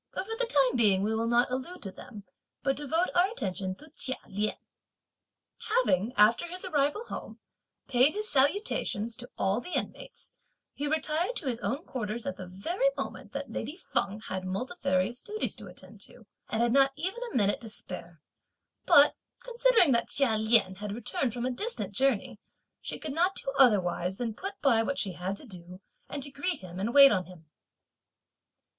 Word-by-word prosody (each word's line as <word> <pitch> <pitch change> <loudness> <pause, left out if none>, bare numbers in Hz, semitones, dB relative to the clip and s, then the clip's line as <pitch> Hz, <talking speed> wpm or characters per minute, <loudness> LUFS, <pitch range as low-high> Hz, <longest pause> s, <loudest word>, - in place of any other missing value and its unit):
But - - -3
for 450 +2 -4
the - - -1
time 275 - +3
being 200 -5 +4
we 215 +2 0
will 225 +1 -1
not 240 +1 +2
allude 265 +8 -5
to 195 - -4
them, 210 +1 -11 0.4
but 270 -1 +1
devote 320 +5 0
our 360 +2 +4
attention 190 - -4
to 305 +8 -15
Chia 260 -3 0
Lien. 210 +2 -2 1.1
Having, 250 - +2
after 220 +10 +4
his 365 +2 -5
arrival 295 +9 0
home, - - -8 0.5
paid 260 +2 +4
his 425 +1 -1
salutations 265 - +2
to 245 - -8
all 195 +5 +1
the 360 - -5
inmates, - - -5 0.4
he 290 - -3
retired 315 +8 0
to 320 - -3
his 245 -3 -1
own 275 +7 -3
quarters 225 -2 -4
at 185 - -3
the 185 - -8
very 340 - 0
moment - - -6
that - - -5
lady 300 - -4
Feng 210 - -1
had 185 -3 -5
multifarious 195 - -1
duties 430 -1 -2
to - - -7
attend - - -13
to, - - -7 0.2
and 225 +2 0
had 240 0 +2
not 275 0 +4
even 385 - -2
a - - -9
minute 205 -3 +2
to 225 - -6
spare; 170 -6 -3 0.6
but, 285 +1 +7 0.3
considering 475 - +4
that 235 -2 +2
Chia 265 -5 +2
Lien 220 -3 +4
had 205 0 -5
returned 260 +2 -2
from 240 +2 -3
a 255 - 0
distant 245 - -3
journey, 250 -1 0 0.4
she - - -5
could 300 - -6
not 355 +5 +2
do 270 - -2
otherwise 190 -7 +3
than 230 -2 -3
put 395 - -7
by 240 -5 +4
what 275 +5 -2
she 195 - -1
had 180 +3 -4
to - - -11
do, 180 -4 -12 0.3
and 285 -2 -4
to 280 - -4
greet 290 +4 -2
him 180 -1 -9
and 210 +5 -1
wait 275 +1 +9
on 185 -3 0
him. 180 -3 -15
245 Hz, 185 wpm, -29 LUFS, 205-305 Hz, 1.1 s, wait